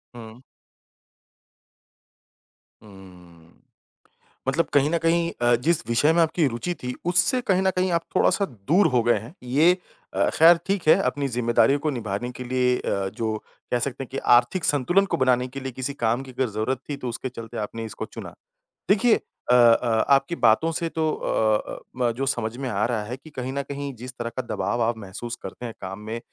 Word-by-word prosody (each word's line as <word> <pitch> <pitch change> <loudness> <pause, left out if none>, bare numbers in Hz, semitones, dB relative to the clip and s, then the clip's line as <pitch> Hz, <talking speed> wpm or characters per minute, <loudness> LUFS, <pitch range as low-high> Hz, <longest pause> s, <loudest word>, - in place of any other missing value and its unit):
हुँ। 115 0 -11 2.4
हुँ, 90 -5 -16 1.0
मतलब 150 +5 +2
कहीं 145 +1 +4
न 170 - +1
कहीं 170 0 +2
अ, 120 0 +4
जिस 155 +7 0
विषय 130 +7 +3
में 170 - +4
आपकी 165 0 +2
रुचि 130 +8 -3
थी 125 0 -3
उससे 180 +9 +3
कहीं 190 -5 +1
न 190 - +3
कहीं 185 0 +1
आप 170 -1 +1
थोड़ा-सा 200 - +3 0.2
दूर 180 +5 +5
हो 125 -4 +2
गए 120 -1 +3
हैं। 115 +8 -11
ये 155 +9 +3 0.4
अ, - - +2
खैर 165 +2 +7
ठीक 195 -5 -1
है - - +8
अपनी 140 +2 -1
जिम्मेदारियों 125 +3 +2
को 155 - -1
निभाने 115 -1 -4
के 125 - -8
लिए 125 0 +1
अ, 100 -1 -2
जो 110 -1 -1 0.3
कह 125 - +2
सकते 135 +2 -3
हैं 130 - -12
कि 135 - -4 0.2
आर्थिक 120 +9 +2
संतुलन 175 +8 +2
को - - -2
बनाने 125 -1 +2
के 135 +2 -7
लिए 135 0 -5
किसी 130 +3 -4
काम 120 -1 0
की 130 - -11
अगर 130 -1 -1
जरूरत 110 +5 -2
थी, 145 - -2
तो 130 -3 -5
उसके 125 +2 -4
चलते 115 -3 -9
आपने 115 +2 -4
इसको 110 - -6
चुना। - - -9 0.6
देखिए 220 +3 +5 0.4
अ - - +7
अ, 115 -1 +4
आपकी 140 +4 +3
बातों 120 +6 +3
से 165 +1 -2
तो 160 -1 -1
अ 110 -1 +1 0.2
अ, - - -7 0.2
म 125 -2 +1
जो 135 +2 -2
समझ 120 -3 -2
में 135 0 -4
आ 105 -2 0
रहा 115 -3 -1
है 120 +4 -5
कि 155 +4 -15
कहीं 130 -2 -5
न 140 +1 -2
कहीं 140 -1 -5
जिस 125 +3 -8
तरह 115 0 -3
का 130 - -1
दबाव 120 - -1
आप 115 0 0
महसूस 110 +4 -7
करते 125 - -7
हैं 115 - -7
काम 95 +1 -6
में 110 +2 -5
125 Hz, 200 wpm, -24 LUFS, 115-150 Hz, 2.4 s, है